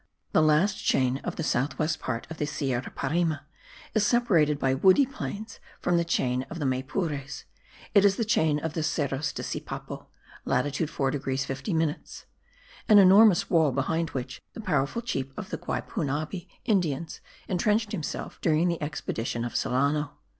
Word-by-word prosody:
The - - +4
last 155 +6 +3
chain 130 0 +2
of - - -5
the 160 - -3
south 135 0 0
west 155 0 0
part 115 -2 -3
of 160 - -6
the 150 - 0
Sierra 135 -4 -2
Parime 160 +2 0 0.6
is 215 - +2
separated 190 - +3
by 135 -2 +1
woody 190 - +5
plains 220 -5 -6 0.2
from 175 -1 +1
the 170 - +2
chain 130 -6 0
of 170 - -6
Maypures; 140 +1 -2 0.5
it 200 -2 +6
is 200 -1 +5
the 230 - -1
chain 160 -8 +2
of 155 +1 -3
the 160 - -2
Cerros 145 -2 -1
de - - -6
Sipapo - - -6 0.4
(latitude 145 +4 0
4 135 -1 0
degrees 135 -1 -2
50 135 +7 -3
minutes); 160 -2 -2 0.6
an 210 - +8
enormous 195 0 +6
wall 160 -4 +4
behind 160 +5 -1
which 130 -1 -5
the - - -9
powerful 220 - -1
chief 135 - -3
of - - -7
the - - -2
Guaypunabi 155 0 -3 0.2
Indians 170 - 0 0.3
intrenched 210 +4 +1
himself 165 -8 -5
during 165 +2 +2
the 170 -2 -2
expedition 120 -5 -3
of 120 - -6
Solano. 145 +3 0
155 Hz, 160 wpm, -27 LUFS, 135-180 Hz, 0.6 s, an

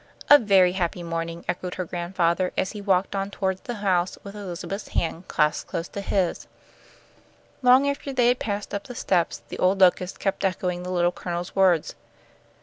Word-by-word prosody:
"A 290 - +11
very 195 -5 +4
happy 180 -1 -2
morning," 165 0 -4
echoed 180 0 -3
her 185 - -3
grandfather, 175 +1 0
as 185 - 0
he 210 - -7
walked 195 -1 +1
on 195 0 -2
toward 190 -2 -2
the 240 - -4
house 180 -1 +1
with 200 - -9
Elizabeth's 195 +1 -6
hand 170 +1 -2
clasped 150 0 0
close 165 +1 -3
in 200 - -5
his 190 -3 -1
own. - - -35 1.2
Long 260 +3 +6
after 280 0 -2
they 245 -2 +3
had 250 - +1
passed 205 -1 -4
up 200 0 -3
the 245 - -9
steps 180 -6 0
the - - -7
old 190 +2 +2
locusts 180 0 +3
kept 195 - -2
echoing 180 -2 -1
the 180 - -6
Little 175 -1 +2
Colonel's 175 0 -5
words. 185 -5 +3
185 Hz, 185 wpm, -25 LUFS, 175-200 Hz, 1.2 s, A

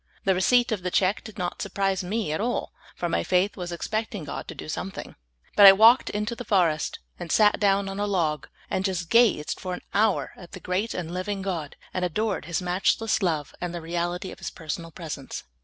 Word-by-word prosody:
' - - -33
' - - -46
The 195 - +4
receipt 240 +7 +3
of 210 -4 -1
the 180 - -2
check 190 +2 +1
did 220 -1 -11
not 180 -2 -3
surprise 195 -2 -1
me 205 -1 -2
at 160 - -2
all, 245 +2 -2 0.2
for 175 - -2
my 165 - 0
faith 185 +3 +1
was 180 -2 -5
expecting 215 +2 -3
God 145 - -6
to - - -7
do - - -8
something; 185 +5 -5 0.4
but 205 -1 +10
I 195 - +12
walked 225 +5 +6
into 210 +3 -2
the 245 - -6
forest 175 -8 +1 0.2
and 175 -2 -5
sat 210 -1 +4
down 200 -1 +2
on 195 +1 -5
a 205 - 0
log, 160 -7 0 0.2
and 185 - -1
just 180 -3 -2
gazed 230 -10 +3
for 185 -2 -4
an - - -10
hour 210 0 +2
at 175 -2 -13
the - - -7
great 185 +6 -2
and 170 -1 -4
living 195 +2 -3
God, 170 -7 -3 0.2
and 185 - -1
adored 200 +2 -1
His 170 +2 -2
matchless 195 +5 +1
love 160 -6 -1
and 175 -1 -3
the - - -3
reality 175 +2 -3
of - - -11
His - - -4
personal 165 0 -6
presence. 155 -5 -7
185 Hz, 225 wpm, -26 LUFS, 175-205 Hz, 0.4 s, I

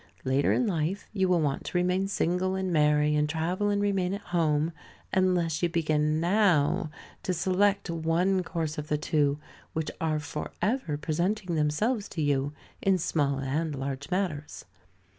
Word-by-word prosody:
Later 135 +2 +2
in 250 - +2
life, 180 0 -1
you 190 -3 +1
will 175 -2 +3
want 145 -3 -1
to - - -2
remain 180 +2 +1
single 185 0 0
and 190 -2 -1
marry, 150 -1 +3
and 150 0 +1
travel 175 +6 0
and 205 0 +1
remain 195 -2 +1
at 200 - -7
home, 155 -2 +2 0.4
unless 180 -4 +2
you 175 - +2
begin 155 -2 +1
now 170 -5 +2 0.3
to 185 - -1
select 195 +4 +2
one 170 +3 +1
course 160 -4 -3
of 150 - -5
the 150 - +1
two 145 -1 +1 0.4
which 160 -1 -2
are 160 -1 +1
for 150 0 -5
ever 205 - 0
presenting 175 +5 -1
themselves 200 +10 0
to 160 - -4
you, 140 -1 +1 0.3
in 195 -1 +3
small 145 -5 0
and 145 +3 -1
large 135 +1 -4
matters. 175 -6 -3
165 Hz, 160 wpm, -28 LUFS, 150-185 Hz, 0.4 s, will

